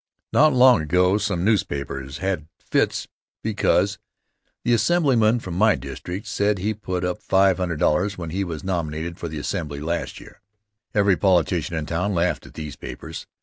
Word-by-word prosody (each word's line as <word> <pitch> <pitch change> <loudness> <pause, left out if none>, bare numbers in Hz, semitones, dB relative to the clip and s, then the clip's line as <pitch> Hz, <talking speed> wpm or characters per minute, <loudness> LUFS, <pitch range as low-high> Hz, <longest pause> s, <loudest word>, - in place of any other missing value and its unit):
Not 155 +1 +6
long 125 -4 +6
ago 90 +6 +2
some 95 -3 -1
newspapers 70 -9 -1
had 90 -5 -2
fits - - 0 0.4
became - - +2 0.8
the 120 - +2
Assemblyman 120 -6 +3
from 90 -6 -7
my 105 +4 +4
district 85 - -6
said 100 0 0
he 95 +4 -1
had 110 0 -4
put 90 -2 -2
up 90 0 -3
$500 95 -1 +2
when 85 -3 -5
he 95 +3 -1
was 85 -4 -5
nominated 85 -2 -3
for 85 - -4
the 80 -1 -6
Assembly 75 -2 -3
last 85 +3 -3
year. - - -15 0.5
Every 100 -3 +4
politician 85 -3 +2
in 80 -1 -2
town 90 +5 -1
laughed 85 +1 0
at - - -16
these 75 -3 -6
papers. - - -8
90 Hz, 160 wpm, -23 LUFS, 80-100 Hz, 0.8 s, Not